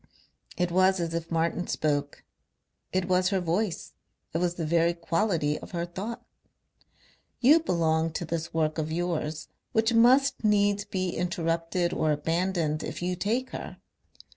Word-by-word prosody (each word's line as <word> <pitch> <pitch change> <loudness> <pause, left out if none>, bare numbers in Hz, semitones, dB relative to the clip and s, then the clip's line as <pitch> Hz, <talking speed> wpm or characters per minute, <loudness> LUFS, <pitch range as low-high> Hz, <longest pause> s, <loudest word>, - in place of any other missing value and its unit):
It 180 -1 0
was 185 +1 +4
as 165 -1 -2
if 165 0 -3
Martin 170 +2 0
spoke; 145 -2 -1 0.7
it 185 -1 0
was 185 0 +3
her 195 -2 +1
voice; 180 +1 -1 0.4
it 165 - 0
was 175 0 0
the 165 - -3
very 170 +1 +2
quality 170 -3 0
of - - -12
her 170 0 -1
thought. 200 +7 -6 1.1
"You 290 +6 +6
belong 165 - +1
to 170 - -3
this 165 +1 -3
work 160 -1 0
of 155 0 -2
yours, 160 -2 -2 0.2
which 225 0 +2
must 255 +5 +4
needs 205 -1 +2
be 185 -1 -2
interrupted 170 0 -1
or 155 - +1
abandoned 165 +1 0
if - - -5
you 180 0 -1
take 235 +8 -1
her. - - -7
175 Hz, 150 wpm, -27 LUFS, 165-190 Hz, 1.1 s, You